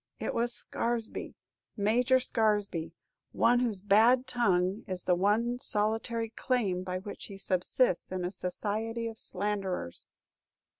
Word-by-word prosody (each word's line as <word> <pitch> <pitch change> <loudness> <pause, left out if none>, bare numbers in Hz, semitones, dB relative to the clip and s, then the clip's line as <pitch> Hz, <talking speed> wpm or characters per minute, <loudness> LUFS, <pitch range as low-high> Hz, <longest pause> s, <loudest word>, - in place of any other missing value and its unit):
It - - -2
was 235 +1 0
Scaresby, 230 0 -2 0.4
Major 245 +5 +3
Scaresby; 205 -9 0 0.4
one 240 +1 +4
whose 225 -6 0
bad 225 +6 +5
tongue 190 -5 +1
is 185 -1 -4
the 180 - +3
one 215 +7 +2
solitary 225 0 0
claim 220 -8 0
by 185 0 -3
which 200 +2 -7
he 195 - -9
subsists 185 +2 +1
in 185 -1 -2
a 180 - -2
society 215 +5 -3
of 225 -1 -7
slanderers!" 190 - -3
210 Hz, 130 wpm, -30 LUFS, 185-235 Hz, 0.4 s, bad